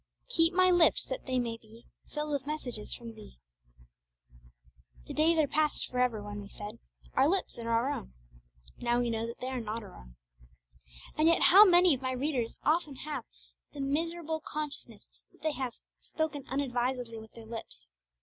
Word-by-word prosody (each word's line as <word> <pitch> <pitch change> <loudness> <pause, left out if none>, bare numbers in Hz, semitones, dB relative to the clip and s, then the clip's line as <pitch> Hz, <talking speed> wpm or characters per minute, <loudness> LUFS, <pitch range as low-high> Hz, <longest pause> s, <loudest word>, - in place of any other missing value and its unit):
'Keep 330 -6 +4
my 370 0 +6
lips, 350 -2 +5
that - - -6
they 260 -1 0
may 235 -2 -1
be 225 +1 -17 0.3
Filled 300 0 -3
with 285 -1 -2
messages 250 -8 -4
from 230 -1 -6
Thee.' 215 - -13 1.7
The - - -7
days 325 +2 +3
are 310 - +5
past 300 +1 +1
for 250 - -3
ever 240 -4 +1
when 205 0 -6
we 200 - -10
said, 210 +3 -8 0.3
'Our 270 +3 +4
lips 375 -8 -1
are 230 0 -4
our 230 +4 +2
own.' 65 - -6 0.7
Now 240 0 +1
we 240 -1 0
know 225 0 -1
that 235 - -8
they 255 - -2
are 260 -2 -2
not 225 +1 -4
our 195 - -11
own. - - -14 1.0
And 310 +1 +3
yet 335 - +4
how 400 +4 +9
many 355 -3 +6
of 260 - -3
my 260 0 -1
readers 255 -3 -1
often 310 -3 +1
have 300 +3 -5 0.5
the 290 - -9
miserable 320 +3 -1
consciousness 285 -7 -6 0.3
that - - -24
they 315 - +2
have 260 -4 -4 0.3
'spoken 310 -3 -3
unadvisedly 250 -3 -1
with 220 0 -13
their 230 -1 -11
lips'! 225 0 -8
260 Hz, 180 wpm, -31 LUFS, 230-310 Hz, 1.7 s, how